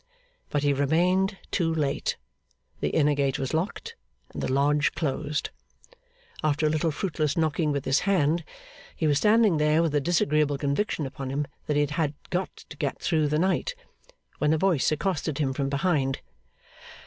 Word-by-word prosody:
But 145 -1 -1
he 145 -1 +3
remained 180 +8 +2
too 165 -3 +1
late. 150 -4 -1 0.6
The - - 0
inner 150 -1 +3
gate 140 -2 0
was 135 +1 -3
locked, 200 - -3 0.4
and - - -5
the - - -1
lodge 145 +2 +2
closed. 150 -1 -2 0.9
After 155 0 +1
a 150 - +3
little 155 +1 +1
fruitless 155 -2 -1
knocking 155 -1 +1
with 140 -2 -2
his 135 - +3
hand, 170 -4 +1 0.5
he 160 - -2
was 145 -2 +3
standing 210 -3 +4
there 150 +2 +3
with 165 - +1
the 145 0 +1
disagreeable 150 -2 +2
conviction 145 +3 -1
upon 135 0 -6
him 145 +2 -1 0.2
that 150 - +1
he 145 - +4
had 150 0 -1 0.2
got 185 +1 0 0.2
to 150 - -10
get 140 -2 -2
through 155 -3 +1
the 150 +1 +1
night, 190 - 0 0.6
when 150 +1 +3
a - - +2
voice 170 -6 +2
accosted 155 -2 -1
him 140 -3 0
from 135 +1 -1
behind. 140 -2 0
150 Hz, 170 wpm, -26 LUFS, 145-165 Hz, 0.9 s, standing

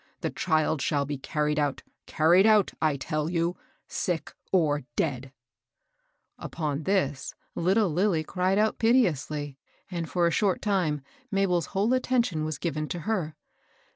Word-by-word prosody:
The - - -2
child 155 -3 +1
shall 145 0 +1
be 145 -1 -4
carried 150 +2 -1
out, 145 -2 -1
— - - -56
carried 175 +6 +4
out, 215 -3 +4
I 155 -3 +2
tell 155 +3 -2
you, 170 0 0 0.3
sick 175 -3 -3 0.2
or 155 -6 +2 0.2
deacL^^ 135 -4 -1 1.1
Upon 150 -2 -3
this, 145 -9 0 0.2
little 195 +5 +2
Lilly 175 -1 +1
cried 185 +3 0
out 215 +1 +1
piteously, 150 - +1 0.3
and, 170 -2 -3
for 175 -1 +1
a 170 - +3
short 195 +1 +1
time, 180 -8 0 0.3
Mabel's 180 -5 +1
whole 215 +6 +3
attention 240 -10 +1
was 155 -2 -3
given 155 -2 -2
to 175 - -4
her. 170 -5 -2
165 Hz, 145 wpm, -27 LUFS, 150-190 Hz, 1.1 s, carried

